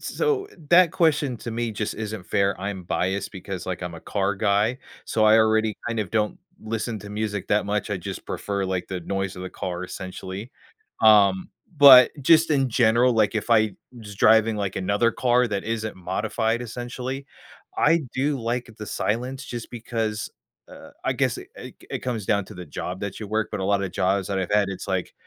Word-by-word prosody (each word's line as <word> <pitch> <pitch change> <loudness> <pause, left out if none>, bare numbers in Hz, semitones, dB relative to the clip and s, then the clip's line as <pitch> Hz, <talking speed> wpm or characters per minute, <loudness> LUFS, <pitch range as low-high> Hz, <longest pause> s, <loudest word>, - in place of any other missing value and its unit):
so, 425 -3 -1 0.2
that 175 -1 +6
question 150 -8 +2
to 115 - -6
me 115 0 -2
just 105 0 -3
isn't 110 -4 -6
fair, 100 0 +1
I'm 100 -2 -4
biased 95 +3 -2
because, 95 -1 -6
like, 90 -1 -4
I'm 90 -1 -5
a 80 - -9
car 100 0 -1
guy, 105 +5 +1 0.3
so 110 -1 +1
I 110 +1 +7
already 110 -1 +2
kind 115 -2 -1
of 100 -4 -4
don't 105 -1 0 0.2
listen 110 0 -3
to 100 0 -10
music 105 -2 -3
that 105 0 +2
much, 105 +1 -2
I 105 - 0
just 90 - -7
prefer, 100 -1 -3
like, 95 -1 -3
the 95 -2 -4
noise 95 +1 -3
of 90 - -7
the 95 - -6
car 90 0 -4
essentially, 95 +4 -7 0.5
um, 100 -3 +5 0.3
but 135 -3 +9
just 165 +3 +5
in 135 -3 +2
general, 120 +1 +4
like 110 -1 +2
if 110 +2 -3
I 110 -3 +4 0.3
just 105 -2 -10
driving, 110 0 +5
like, 100 -2 -3
another 100 +5 +1
car 125 +1 +2
that 100 -1 -3
isn't 110 -1 -3
modified, 110 +5 -1
essentially, 125 +3 -5 0.5
I 170 - +4
do 140 +2 0
like 120 +1 -2
the 105 - -6
silence 125 +8 -2
just 120 -4 -7
because, 110 -2 -3 0.4
uh, - - -13
I - - +1
guess - - 0
it - - -10
c - - -9 0.2
it - - -2
comes 115 -5 -3
down 100 -2 +1
to 105 - -11
the 90 0 -8
job 90 +5 -5
that 100 +1 -5
you 105 - -5
work, 110 0 0
but 105 - -4
a - - -2
lot 100 0 +1
of 95 - -4
jobs 95 +1 0
that 100 - -1
I've 95 -2 -3
had, 105 -1 +3
it's 95 - -7
like 95 -2 -2
110 Hz, 200 wpm, -24 LUFS, 100-120 Hz, 0.5 s, but